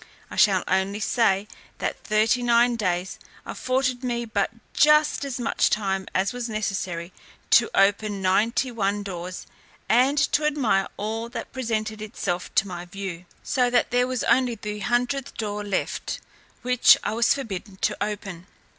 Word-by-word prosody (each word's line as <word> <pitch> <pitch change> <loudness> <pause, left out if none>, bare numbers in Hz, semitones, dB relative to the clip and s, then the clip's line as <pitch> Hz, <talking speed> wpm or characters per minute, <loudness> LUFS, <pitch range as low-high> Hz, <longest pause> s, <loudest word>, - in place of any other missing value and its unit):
I - - -6
shall 195 -3 +4
only 190 +2 0
say, 210 -3 +1 0.3
that - - -4
thirty 220 +3 +2
nine 240 0 +3
days 185 -4 -2 0.3
afforded 255 0 -1
me 240 -1 -2
but 210 -3 0 0.2
just 300 0 +4
as 270 -3 -4
much 240 - +1
time 195 -3 -1
as 190 +4 +1
was 245 -1 -4
necessary 190 -5 -3 0.4
to - - +6
open 205 +1 +2
ninety 220 +7 +1
nine 205 -2 -1
doors, 180 -2 -6 0.4
and 255 +5 +3
to 295 +1 +2
admire 250 -10 +1
all 225 +3 -3
that - - -6
presented 220 -4 -2
itself 180 -5 -3
to 200 - +3
my 175 -1 -6
view, 180 -1 -7 0.2
so 250 -2 +1
that 245 -1 +2
there 245 0 +2
was 255 -2 -2
only 250 -2 +2
the 210 -1 -6
hundredth 245 +4 -1
door 210 -1 -3
left, 200 -2 -3 0.4
which 250 0 +6
I - - -1
was 230 +3 +3
forbidden 205 -6 -6
to - - 0
open. 195 -4 -6
215 Hz, 155 wpm, -24 LUFS, 195-245 Hz, 0.4 s, to